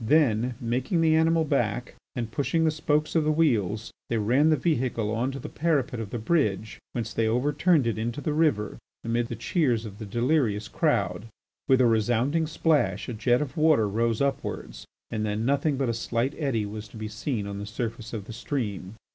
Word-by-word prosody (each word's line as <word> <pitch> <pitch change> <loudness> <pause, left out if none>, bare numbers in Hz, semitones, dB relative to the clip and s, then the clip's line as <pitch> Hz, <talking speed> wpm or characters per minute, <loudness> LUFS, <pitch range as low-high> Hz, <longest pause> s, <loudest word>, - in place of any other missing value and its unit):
Then, 125 -3 +3
making 125 +8 0
the 160 -1 +4
animal 160 0 +3
back 125 -5 -1 0.2
and 115 -3 -3
pushing 145 +7 0
the 160 - +3
spokes 150 0 0
of 160 - +4
the 155 - +2
wheels, 115 - +1 0.2
they 115 - +1
ran 125 +9 +3
the 155 - +5
vehicle 125 -8 0
on 125 +4 0
to 135 - -6
the 135 - -7
parapet 140 -7 0
of 110 -3 -5
the 120 - -4
bridge, 110 - 0
whence 115 -3 -3
they 115 -1 +1
overturned 145 +6 +2
it 115 -2 -1
into 120 +5 -2
the 150 +1 -2
river 150 -10 +1 0.2
amid 115 +1 0
the - - -5
cheers 125 -10 0
of 105 -1 -9
the 110 - -6
delirious 115 -2 +1
crowd. 105 +2 0 0.4
With 130 -1 +5
a - - +5
resounding 120 +8 +2
splash 145 - +1
a - - -3
jet 120 +4 +2
of 145 - -8
water 155 -9 +4
rose 115 +4 0
upwards, 140 0 -3 0.2
and 110 - -2
then 105 +1 -1
nothing 140 +2 +1
but 135 -1 0
a 115 - 0
slight 115 +3 -1
eddy 135 -9 -1
was 105 +1 -7
to 105 - -12
be 110 0 -4
seen 110 0 -3
on 100 0 -5
the 105 - -6
surface 115 0 -5
of 105 -4 -5
the 115 - -8
stream. 110 -6 -4
120 Hz, 200 wpm, -26 LUFS, 110-145 Hz, 0.4 s, the